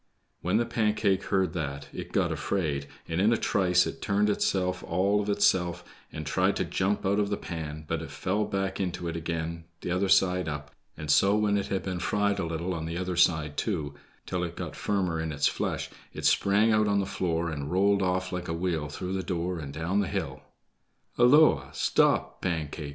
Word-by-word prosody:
When 90 +4 +1
the 120 - +2
Pancake 105 -4 +1
heard 95 -4 +1
that 70 -4 -4
it - - -7
got - - +1
afraid, 75 -8 -1 0.2
and 80 +2 -1
in 105 +3 +4
a 115 - +3
trice 90 -4 +3
it - - -6
turned 105 +1 +2
itself 90 -2 0
all 100 +4 +1
of 105 - -4
itself, 90 -4 +2 0.3
and - - -6
tried - - +1
to - - 0
jump 100 +2 -1
out 100 +2 +2
of 100 -1 +1
the 100 - -1
pan; 80 -2 -6
but 80 0 -2
it 80 - -7
fell 95 +8 -1
back 95 -1 -2
into 90 -2 -2
it 85 - -3
again 85 0 -4
t'other 90 +2 -1
side 90 -3 +3
up, 75 0 -6 0.3
and 75 -1 -2
so 100 +6 +5
when 105 -1 +2
it 100 - 0
had 95 - -2
been 90 -2 -3
fried 100 +2 +1
a 85 - -1
little 85 +3 -2
on 80 -2 -4
the 85 +1 -3
other 90 0 -2
side, 80 -4 +2
too, 80 -10 -2 0.3
till 90 -1 -2
it 85 -1 -4
got - - -6
firmer 90 -5 -1
in 80 -1 -3
its 70 -1 0
flesh, - - -1 0.2
it - - -5
sprang 105 +3 +4
out 110 -1 +3
on 100 -1 +2
the 100 - 0
floor, 85 -4 -1
and 70 -1 -4
rolled 100 +2 +3
off 90 0 0
like 90 -1 -4
a 85 - -2
wheel 85 -4 -1
through 90 +5 -5
the 95 - -1
door 90 -1 -2
and 70 -3 -6
down 80 +7 -1
the 100 - +1
hill. - - -3 0.8
"Holloa! 145 +6 +5
Stop, - - +2
Pancake!" 80 -4 -3
90 Hz, 205 wpm, -28 LUFS, 80-100 Hz, 0.8 s, so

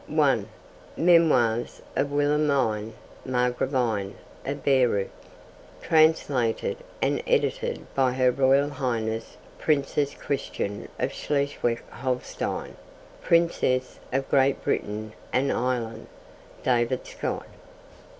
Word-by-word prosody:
(1) - - +2 0.5
Memoirs 150 -10 +3 0.2
of 140 0 0
Wilhelmine 140 -7 +1 0.3
Margravine 125 -4 0 0.3
of 140 0 -4
Baireuth. 125 -8 +2 0.7
Translated 145 -7 +2 0.3
and - - +1
edited 485 -1 0
by 130 -2 +2
Her 130 -1 +3
Royal 135 +2 +3
Highness 115 -5 -3 0.2
Princess 145 -1 +1
Christian 105 -7 -3
of - - -1
Schleswig 140 -5 -1
Holstein, 125 0 -3 0.4
Princess 165 -7 +1
of 135 +1 0
Great 135 0 +3
Britain 110 +1 -2 0.2
and 135 +2 +2
Ireland. 120 -2 -2 0.6
(David 120 0 +1
Stott.) - - -4
130 Hz, 90 wpm, -26 LUFS, 120-145 Hz, 0.7 s, Memoirs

